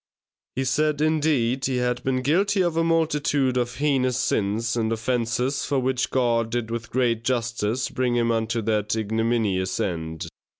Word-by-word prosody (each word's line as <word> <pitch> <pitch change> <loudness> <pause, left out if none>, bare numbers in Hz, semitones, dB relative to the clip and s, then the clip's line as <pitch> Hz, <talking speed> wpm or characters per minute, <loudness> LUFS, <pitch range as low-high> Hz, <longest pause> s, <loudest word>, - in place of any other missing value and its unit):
He 135 - 0
said, 150 +3 +1
indeed, 150 -5 +1
he 130 - 0
had 125 0 -1
been 130 -1 0
guilty 190 - +2
of 170 -2 0
a 165 - +2
multitude 150 -5 +1
of 120 -1 -1
heinous 135 -4 +1
sins 110 +3 0
and 115 -1 0
offences 120 +3 -1
for 140 - -1
which 130 0 0
God 115 -3 +1
did 115 -1 -3
with 115 -1 -4
great 120 -3 0
justice 120 -1 -1
bring 125 -1 -1
him 115 -1 +2
unto 115 0 -1
that 105 0 0
ignominious 110 -3 0
end. 80 -3 -3
120 Hz, 160 wpm, -24 LUFS, 115-135 Hz, -, guilty